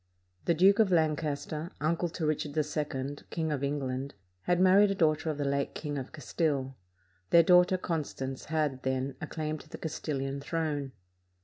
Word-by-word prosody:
The 170 Hz, -, +3 dB
Duke 195 Hz, +5 st, +5 dB
of 210 Hz, -4 st, +4 dB
Lancaster, 155 Hz, -1 st, 0 dB
uncle 165 Hz, +3 st, 0 dB
to 165 Hz, 0 st, -3 dB
Rich 155 Hz, 0 st, 0 dB
ard 145 Hz, +2 st, -9 dB
II, 145 Hz, -2 st, -2 dB
King 160 Hz, -2 st, -2 dB
of 140 Hz, -2 st, -2 dB
England, 140 Hz, -2 st, -2 dB, 0.3 s
had 175 Hz, 0 st, +2 dB
married 190 Hz, +2 st, +6 dB
a 195 Hz, -, 0 dB
daughter 160 Hz, -2 st, +2 dB
of 155 Hz, -, -2 dB
the 145 Hz, -, -1 dB
late 140 Hz, 0 st, -1 dB
King 150 Hz, -2 st, -4 dB
of 130 Hz, -, -7 dB
Castile. 145 Hz, -4 st, -1 dB, 0.5 s
Their 170 Hz, -, +7 dB
daughter 180 Hz, +2 st, +5 dB
Constance 145 Hz, -6 st, -4 dB
had, 150 Hz, -4 st, -1 dB
then, 130 Hz, +1 st, -1 dB
a 160 Hz, -, -4 dB
claim 155 Hz, -1 st, -3 dB
to -, -, -15 dB
the -, -, -7 dB
Castilian 140 Hz, -3 st, -3 dB
throne. 145 Hz, -3 st, -2 dB
155 Hz, 175 wpm, -30 LUFS, 140-165 Hz, 0.5 s, Their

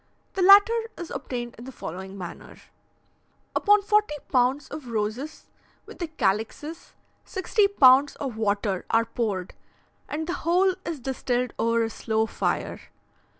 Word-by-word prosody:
The 385 Hz, -, -2 dB
latter 400 Hz, +4 st, +8 dB, 0.2 s
is 345 Hz, -, -7 dB
obtained 245 Hz, -3 st, -5 dB
in 235 Hz, -, -9 dB
the 265 Hz, -, -8 dB
following 190 Hz, -2 st, -7 dB
manner: 180 Hz, -3 st, -9 dB, 1.0 s
Upon 415 Hz, 0 st, +4 dB
forty 420 Hz, -6 st, +2 dB, 0.2 s
pounds 260 Hz, +2 st, +2 dB
of 295 Hz, -5 st, -8 dB
roses, 230 Hz, +7 st, -3 dB, 0.4 s
with -, -, -13 dB
the 345 Hz, -, -2 dB
calixes, 265 Hz, -, -2 dB, 0.3 s
sixty 400 Hz, +2 st, +1 dB
pounds 275 Hz, -7 st, +5 dB
of 265 Hz, -5 st, -5 dB
water 205 Hz, -3 st, -1 dB
are 230 Hz, 0 st, +3 dB
poured, 205 Hz, -7 st, -3 dB, 0.6 s
and 315 Hz, +2 st, -3 dB
the 345 Hz, -, -3 dB
whole 365 Hz, +3 st, +3 dB
is 325 Hz, -4 st, -4 dB
distilled 250 Hz, -1 st, -2 dB
over 230 Hz, 0 st, +2 dB
a 225 Hz, -, -1 dB
slow 220 Hz, 0 st, 0 dB
fire. -, -, -2 dB
255 Hz, 140 wpm, -25 LUFS, 220-335 Hz, 1.0 s, latter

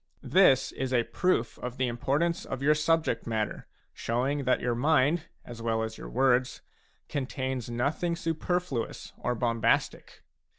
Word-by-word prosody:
This 135 Hz, -9 st, +4 dB
is 130 Hz, -1 st, -3 dB
a 120 Hz, -2 st, +3 dB
proof 125 Hz, -5 st, 0 dB
of 125 Hz, 0 st, -5 dB
the 130 Hz, -, +1 dB
importance 145 Hz, +9 st, 0 dB
of 135 Hz, 0 st, -5 dB
your 150 Hz, +2 st, +5 dB
subject 155 Hz, -6 st, +1 dB
matter, 110 Hz, -2 st, -2 dB, 0.3 s
showing 135 Hz, +4 st, -1 dB
that 130 Hz, -, +3 dB
your 120 Hz, 0 st, 0 dB
mind, 150 Hz, +5 st, +2 dB, 0.2 s
as 120 Hz, -1 st, -9 dB
well 115 Hz, -1 st, 0 dB
as 110 Hz, 0 st, -5 dB
your -, -, -8 dB
words, 130 Hz, -, +2 dB, 0.4 s
contains 130 Hz, -3 st, -3 dB
nothing 145 Hz, +8 st, -1 dB
superfluous 165 Hz, -5 st, -2 dB
or 125 Hz, -, -1 dB
bombastic. 115 Hz, -1 st, 0 dB
130 Hz, 140 wpm, -28 LUFS, 120-150 Hz, 0.4 s, your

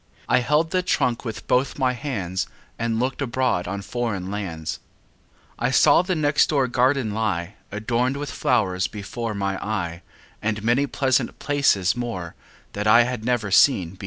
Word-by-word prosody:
I -, -, +4 dB
held 150 Hz, +6 st, +1 dB
the 185 Hz, -, +2 dB
trunk 125 Hz, -9 st, 0 dB
with 115 Hz, -2 st, -6 dB
both 130 Hz, +2 st, +1 dB
my 130 Hz, -2 st, +1 dB
hands 105 Hz, -, -3 dB, 0.3 s
And 115 Hz, -1 st, 0 dB
looked 130 Hz, +2 st, -1 dB
abroad 130 Hz, -8 st, 0 dB
in 100 Hz, -1 st, -4 dB
foreign 105 Hz, -7 st, -3 dB
lands. 85 Hz, -6 st, -4 dB, 0.8 s
I 125 Hz, -, +1 dB
saw 130 Hz, -, +5 dB
the 185 Hz, 0 st, -1 dB
next 150 Hz, -1 st, +2 dB
door 140 Hz, -4 st, +2 dB
garden 125 Hz, -2 st, +1 dB
lie, 100 Hz, -4 st, -2 dB, 0.2 s
Adorned 120 Hz, +5 st, -1 dB
with 145 Hz, 0 st, -4 dB
flowers, 95 Hz, -7 st, +1 dB
before 110 Hz, +2 st, -5 dB
my 100 Hz, -1 st, -2 dB
eye, 90 Hz, -5 st, -3 dB, 0.4 s
And 105 Hz, 0 st, -2 dB
many 120 Hz, +5 st, +2 dB
pleasant 130 Hz, -1 st, 0 dB
places 135 Hz, -10 st, +2 dB
more 115 Hz, -9 st, -4 dB, 0.4 s
That 105 Hz, +1 st, -2 dB
I 115 Hz, +3 st, +7 dB
had 125 Hz, -2 st, -4 dB
never 120 Hz, -4 st, 0 dB
seen 95 Hz, -, +4 dB
before. 95 Hz, -, -16 dB
115 Hz, 160 wpm, -23 LUFS, 100-130 Hz, 0.8 s, I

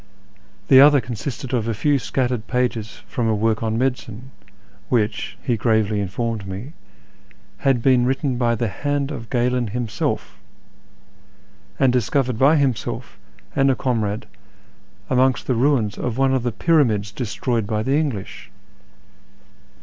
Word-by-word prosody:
The 130 Hz, 0 st, +8 dB
other 145 Hz, 0 st, +7 dB
consisted 120 Hz, +2 st, -5 dB
of 115 Hz, -3 st, 0 dB
a 115 Hz, -, -1 dB
few 140 Hz, +6 st, +2 dB
scattered 125 Hz, -3 st, -2 dB
pages 120 Hz, -3 st, -2 dB
from 120 Hz, -2 st, -2 dB
a 110 Hz, -, +2 dB
work 110 Hz, +1 st, 0 dB
on 110 Hz, -1 st, -1 dB
medicine, 125 Hz, -1 st, -3 dB, 0.6 s
which, 115 Hz, -3 st, -1 dB
he 125 Hz, -4 st, +1 dB
gravely 110 Hz, -1 st, +1 dB
informed 105 Hz, +1 st, -3 dB
me, 100 Hz, +11 st, -7 dB, 0.8 s
had 135 Hz, -4 st, +1 dB
been 125 Hz, -2 st, +4 dB
written 135 Hz, -1 st, -1 dB
hj 120 Hz, -2 st, +1 dB
the 115 Hz, -, 0 dB
hand 145 Hz, +7 st, -2 dB
of 115 Hz, -5 st, -7 dB
Galen 125 Hz, -1 st, +1 dB
himself, 110 Hz, -2 st, -3 dB, 1.4 s
and 130 Hz, -2 st, +4 dB
discovered 125 Hz, 0 st, 0 dB
by 140 Hz, +4 st, +5 dB
himself 135 Hz, -7 st, -2 dB, 0.4 s
and 135 Hz, 0 st, +3 dB
a 130 Hz, -, +3 dB
comrade 110 Hz, -5 st, -1 dB, 0.8 s
amongst 130 Hz, -1 st, +2 dB
the 130 Hz, -, +1 dB
ruins 120 Hz, -4 st, +1 dB
of 125 Hz, -1 st, -3 dB
one 135 Hz, 0 st, +2 dB
of 130 Hz, -, +1 dB
the 120 Hz, 0 st, -1 dB
lyyramids 110 Hz, -, +2 dB
destroyed 115 Hz, -2 st, -2 dB
hy 110 Hz, -1 st, 0 dB
the 135 Hz, +4 st, +1 dB
English 135 Hz, -11 st, -4 dB
120 Hz, 140 wpm, -21 LUFS, 110-135 Hz, 1.4 s, The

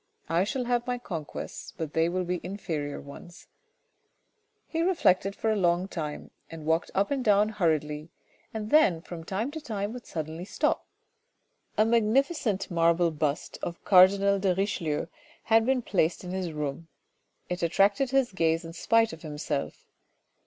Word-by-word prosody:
I 170 Hz, +3 st, +2 dB
shall 250 Hz, +5 st, -2 dB
have 240 Hz, 0 st, 0 dB
my 250 Hz, 0 st, 0 dB
conquests, 165 Hz, -, -7 dB
but 160 Hz, -3 st, -4 dB
they 165 Hz, +1 st, +2 dB
will 185 Hz, +1 st, -1 dB
be 180 Hz, 0 st, -2 dB
inferior 160 Hz, -6 st, -4 dB
ones 170 Hz, +5 st, -12 dB, 0.6 s
" 440 Hz, -2 st, -47 dB
He 330 Hz, -, -2 dB
reflected 200 Hz, -, +2 dB
for 220 Hz, -, 0 dB
a -, -, +2 dB
long 180 Hz, -1 st, +2 dB
time, 155 Hz, -6 st, -5 dB, 0.2 s
he 165 Hz, -, -8 dB
walked 160 Hz, +2 st, 0 dB
up 200 Hz, +5 st, +1 dB
and 275 Hz, -2 st, 0 dB
down 210 Hz, -1 st, +4 dB
hurriedly, 155 Hz, -6 st, -1 dB, 0.4 s
and 215 Hz, -1 st, -5 dB
then 190 Hz, -, +4 dB
from 170 Hz, -2 st, -8 dB
time 200 Hz, -, -2 dB
to 315 Hz, +1 st, -6 dB
time 210 Hz, -5 st, -3 dB
would 245 Hz, -1 st, -9 dB
suddenly 160 Hz, +1 st, -5 dB
stop. 190 Hz, -, -1 dB, 0.9 s
A 215 Hz, -, +5 dB
magnificent 230 Hz, -, +1 dB
marble 170 Hz, 0 st, +3 dB
bust 150 Hz, -1 st, -2 dB
of 170 Hz, -, -6 dB
cardinal 195 Hz, +1 st, +6 dB
de 190 Hz, -2 st, +1 dB
Richelieu 175 Hz, -6 st, -1 dB, 0.4 s
had 225 Hz, 0 st, +3 dB
been 260 Hz, -2 st, +2 dB
placed 175 Hz, -4 st, 0 dB
in 180 Hz, -, -6 dB
his 185 Hz, -2 st, -3 dB
room. 150 Hz, +1 st, -4 dB, 0.6 s
It 180 Hz, 0 st, -3 dB
attracted 200 Hz, +9 st, +3 dB
his 270 Hz, -3 st, +2 dB
gaze 165 Hz, -2 st, +1 dB
in 165 Hz, -, -8 dB
spite 225 Hz, +4 st, +2 dB
of 160 Hz, -, -10 dB
himself. 150 Hz, -2 st, -4 dB
185 Hz, 160 wpm, -28 LUFS, 165-220 Hz, 0.9 s, cardinal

